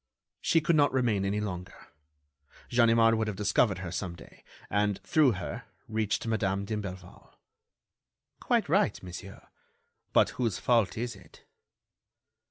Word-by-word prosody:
"She 165 - +3
could 155 +2 +2
not 145 -1 +4
remain 120 -7 +1
any 100 +2 0
longer. 90 -4 -6 0.8
Ganimard 115 -1 +4
would 110 -1 0
have 105 - -3
discovered 100 0 +2
her 90 -2 -6
some 85 0 -4
day, - - -16 0.2
and, 105 -1 +1
through 150 -6 +4
her, 90 -2 -6 0.2
reached 110 0 -1
Madame 100 -3 0
d'Imblevalle." 95 -4 -7 1.0
"Quite - - +1
right, - - +1
monsieur; 95 +2 -9 0.7
but - - +4
whose 115 -6 0
fault 115 -3 +2
is 120 0 -3
it?" - - -18
105 Hz, 130 wpm, -29 LUFS, 95-115 Hz, 1.0 s, not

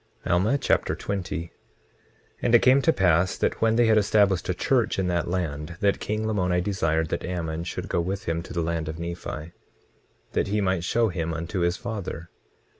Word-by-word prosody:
Alma 95 +10 +2
Chapter - - +1
20 95 -3 -3
20:1 85 - -12 0.9
And 120 - +4
it 120 - +5
came 130 +2 +6
to 150 - +4
pass 90 - +2
that - - -1
when 110 0 +3
they 120 0 +4
had 110 -1 +5
established 100 -4 +2
a - - +2
church - - +1
in 95 - 0
that 85 -2 0
land, 85 -2 -3
that 100 -1 +2
king 110 +1 -2
Lamoni 90 -5 +1
desired 80 -4 0
that - - -2
Ammon 85 -2 -3
should 90 +1 -5
go 85 - 0
with 95 +4 -3
him 85 -4 -1
to - - -11
the 85 -1 -1
land 80 -1 -2
of 80 - -5
Nephi, 85 -1 -6 0.8
that - - 0
he 105 +2 0
might 95 -4 0
show 115 +5 +2
him 85 -2 -3
unto 85 +4 -3
his 85 +1 +1
father. 100 -8 -6
90 Hz, 195 wpm, -25 LUFS, 85-105 Hz, 0.9 s, came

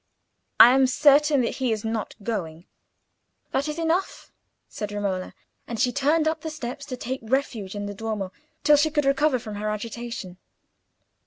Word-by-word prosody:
"I 240 - +11
am 265 0 +4
certain 290 +2 +4
that 235 - -2
he 255 -3 0
is 220 0 -2
not 220 -2 -3
going." 170 -7 -4 0.9
"That 280 +3 0
is 300 +1 -4
enough," 335 +3 -1 0.4
said 210 -1 -6
Romola, 195 -3 -3 0.3
and 230 -2 -5
she 245 - +3
turned 300 +4 +2
up 315 0 -1
the 320 - -4
steps, 280 -1 -6
to 255 -3 -5
take 260 +2 -4
refuge 225 -5 -2
in 205 0 -4
the 205 - -5
Duomo, 205 -2 -4 0.3
till 295 0 +6
she 305 +2 +3
could 295 -2 0
recover 275 0 +3
from 215 -3 -7
her 215 +1 -2
agitation. 215 -3 -5
245 Hz, 170 wpm, -25 LUFS, 210-290 Hz, 0.9 s, I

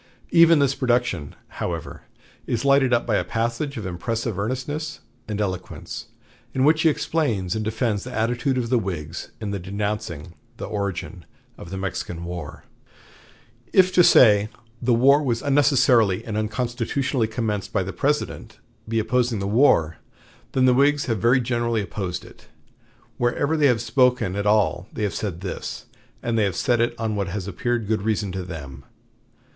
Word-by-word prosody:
Even 165 -1 +7
this 140 -2 +3
production, 120 - 0
however, - - -5 0.5
is 120 +3 -1
lighted 140 -2 +4
up 120 -1 +2
by 110 -3 +1
a - - 0
passage 120 +5 -2
of 110 - -5
impressive 110 +4 -3
earnestness 140 +8 -3 0.3
and 105 -1 -3
eloquence, 95 -3 -4 0.5
in 130 - +2
which 155 +2 +4
he 160 - +5
explains 120 - -1
and 110 - -2
defends 110 -1 -1
the 125 - -7
attitude 120 +3 0
of 120 -2 -1
the 125 - +4
Whigs 85 -5 -5
in 105 -2 -4
denouncing 95 -4 -4 0.2
the - - -5
origin 100 -3 -4 0.3
of 85 - -11
the 95 - -5
Mexican 90 -3 -4
War: 85 -3 -7 1.1
"If 185 -1 +5
to 180 - +6
say 105 -8 +6 0.3
'the 125 0 +1
war 140 +5 +5
was 120 -5 -1
unnecessarily 130 -8 +3
and 110 - -4
unconstitutionally 120 +3 -1
commenced 110 -3 -3
by 95 - 0
the 95 - -6
President,' 140 -6 -2 0.3
be 115 0 -1
opposing 120 +1 +1
the 100 - -3
war, 100 - +3 0.6
then 130 -1 +3
the 125 - +5
Whigs 140 +2 +3
have 115 -4 -1
very 120 +4 +4
generally 120 -3 0
opposed 90 0 -4
it. - - -17 0.7
Whenever 135 +6 +1
they 150 -2 +4
have 120 -3 +2
spoken 125 -5 +2
at 100 0 -1
all 105 -3 +2
they 110 - -4
have 105 - -1
said 90 -5 -4
this; 95 - -5 0.4
and 115 -1 0
they - - +3
have 100 -4 0
said 120 +1 +1
it 120 0 0
on 110 -1 -2
what 100 -1 -1
has 95 +1 -4
appeared 120 +4 -2
good 110 -1 0
reason 105 -2 -1
to 95 +1 -4
them. 70 -7 -8
115 Hz, 165 wpm, -23 LUFS, 100-130 Hz, 1.1 s, Even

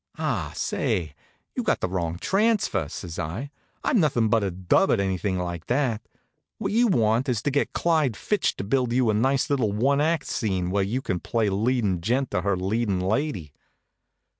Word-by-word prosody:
"Ah, - - -2
say, 115 - -1 0.4
you - - 0
got - - +1
the - - -1
wrong 85 -2 -2
transfer," 195 - +1
says 85 -1 -7
I. 105 - -4 0.3
"I'm 235 - +2
nothin' 120 - +2
but 110 -1 +3
a 100 - 0
dub 95 - +2
at 115 - +3
anything 95 0 -1
like 85 -2 -4
that. 125 -4 0 0.6
What - - -2
you 235 +3 +4
want 120 - +2
is 120 -3 -1
to 145 - 0
get 145 - 0
Clyde 155 -9 +1
Fitch 210 - 0
to - - -5
build 125 +3 0
you 125 -3 +3
a - - -1
nice 130 +5 +2
little 130 -7 +1
one 135 +7 +2
act 160 -1 +1
scene 95 -5 -1
where 100 +1 +1
you 120 +7 -2
can 90 -3 -1
play 110 +1 0
leadin' 105 -3 0
gent 125 +7 0
to 90 - 0
her 100 0 0
leadin' 100 +1 0
lady." 95 - -1
110 Hz, 190 wpm, -25 LUFS, 95-135 Hz, 0.6 s, you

